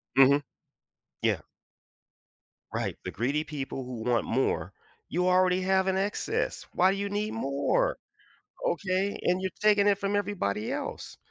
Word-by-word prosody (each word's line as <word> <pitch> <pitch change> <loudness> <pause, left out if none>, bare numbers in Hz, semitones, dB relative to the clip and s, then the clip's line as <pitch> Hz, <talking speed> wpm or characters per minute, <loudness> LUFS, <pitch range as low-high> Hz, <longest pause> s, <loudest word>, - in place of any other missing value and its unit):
Mhm. 140 +2 +6 0.8
Yeah. - - +2 1.3
Right, - - -2
the - - -4
greedy 135 +8 0
people 140 -3 -5
who 120 -3 -6
want 120 -2 +2
more, 130 +3 0 0.4
you 180 +2 +1
already 185 0 +4
have 190 0 +2
an 190 0 +2
excess. 200 +2 -1
Why 185 +2 +4
do 195 - -2
you 200 0 -2
need 210 +1 -2
more? 225 - +1 0.7
Okay, 200 - 0
and 180 +1 +2
you're 190 - -2
taking 205 -1 +4
it 200 -1 +4
from 200 0 -1
everybody 180 - -1
else. - - -5
185 Hz, 145 wpm, -28 LUFS, 140-200 Hz, 1.3 s, Mhm